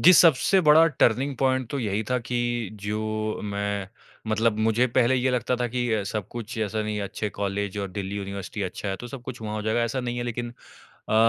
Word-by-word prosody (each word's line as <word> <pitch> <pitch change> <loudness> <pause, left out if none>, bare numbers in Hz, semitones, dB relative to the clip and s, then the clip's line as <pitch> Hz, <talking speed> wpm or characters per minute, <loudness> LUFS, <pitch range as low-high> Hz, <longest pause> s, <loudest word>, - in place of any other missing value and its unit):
जी, 180 - +9
सबसे 175 +3 +6
बड़ा 160 +1 +7
turning 130 -2 +2
point 130 -2 +1
तो 140 - -2
यही 105 -3 -1
था 125 - +3
कि 125 - 0 0.4
जो 110 +1 -2
मैं 100 -1 -2 0.4
मतलब 110 0 +2
मुझे 115 +3 +3
पहले 125 +1 +3
ये 130 0 +2
लगता 125 0 0
था 125 - 0
कि 120 0 -1
अ, 110 - +1
सब 100 -1 -3
कुछ 120 0 -6
ऐसा 110 0 -1
नहीं, 105 -1 -2
अच्छे 100 +2 -3
कॉलेज 100 0 -2
और 100 -1 -2
दिल्ली 100 +1 -4
यूनिवर्सिटी 100 0 -5
अच्छा 95 +2 -4
है, 95 - -1
तो 120 - -8
सब 135 -2 -8
कुछ 130 -2 -7
वहाँ 105 0 -3
हो 105 - -3
जाएगा। 110 +2 +1
ऐसा 125 +3 -1
नहीं 120 -1 -3
है - - -1
लेकिन 120 0 -3 0.6
अ, - - +1
110 Hz, 220 wpm, -26 LUFS, 105-125 Hz, 0.6 s, जी